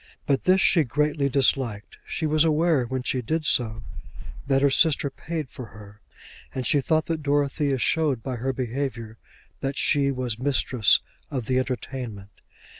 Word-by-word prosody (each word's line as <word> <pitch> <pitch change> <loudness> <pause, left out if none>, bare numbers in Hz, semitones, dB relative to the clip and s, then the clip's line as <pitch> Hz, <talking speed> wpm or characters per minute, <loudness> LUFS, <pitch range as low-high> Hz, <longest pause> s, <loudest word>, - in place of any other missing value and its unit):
But 140 -3 0
this 185 +1 +4
she 170 -4 +4
greatly 145 +2 0
disliked. 125 -5 0
She 160 - -3
was 155 0 +3
aware, 160 -4 +2
when 130 +1 -4
she 130 0 -1
did 155 +6 -2
so, 115 -6 +1 0.6
that 135 0 +2
her 140 - +5
sister 145 -2 +3
paid 160 -1 -5
for 125 - -8
her, 105 -1 -14 0.5
and 130 -1 -3
she 145 - +3
thought 160 +3 +1
that 165 -2 -3
Dorothea 145 -1 0
showed 140 -3 0
by 130 -2 -4
her 130 +3 -1
behaviour 120 -3 -4 0.4
that 135 +1 -3
she 140 -2 +3
was 125 -4 -3
mistress 125 -7 +3 0.3
of 130 -5 -4
the 130 +1 +1
entertainment. 125 -6 -5
135 Hz, 160 wpm, -25 LUFS, 125-150 Hz, 0.6 s, her